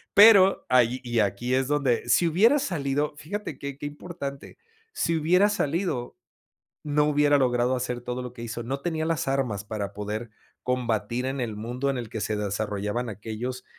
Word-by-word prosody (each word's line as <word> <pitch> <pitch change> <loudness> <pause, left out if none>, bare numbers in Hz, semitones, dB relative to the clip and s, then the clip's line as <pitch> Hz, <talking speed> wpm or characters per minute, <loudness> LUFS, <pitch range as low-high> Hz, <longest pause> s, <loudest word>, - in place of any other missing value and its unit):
Pero, 200 -2 +8
ahí 125 0 +3
y 120 -2 -1
aquí 105 +4 0
es 130 0 +1
donde 140 -5 +1
si 170 +9 +4
hubiera 220 - +4
salido, 145 - -1
fíjate 165 -1 -5
qué 140 -1 -6
qué 145 - -7
importante, 145 -2 -7 0.4
si 165 - 0
hubiera 180 +6 +4
salido, 165 -8 -1 0.7
no 150 0 +2
hubiera 145 -1 +4
logrado 125 -1 +2
hacer 125 -1 -3
todo 125 +1 -4
lo 125 - -6
que 120 - -10
hizo, 120 +1 -5
no 135 +4 -3
tenía 160 -1 -2
las 165 -5 -1
armas 130 -7 -1
para 100 -2 -4
poder 105 +3 -4 0.3
combatir 120 -1 -1
en 135 +1 -2
el 110 -3 -3
mundo 125 +5 -2
en 135 - -1
el 120 -2 -4
que 110 - -5
se 110 - -1
desarrollaban 105 +3 -2
aquellos, 110 +5 -5
130 Hz, 175 wpm, -26 LUFS, 115-150 Hz, 0.7 s, Pero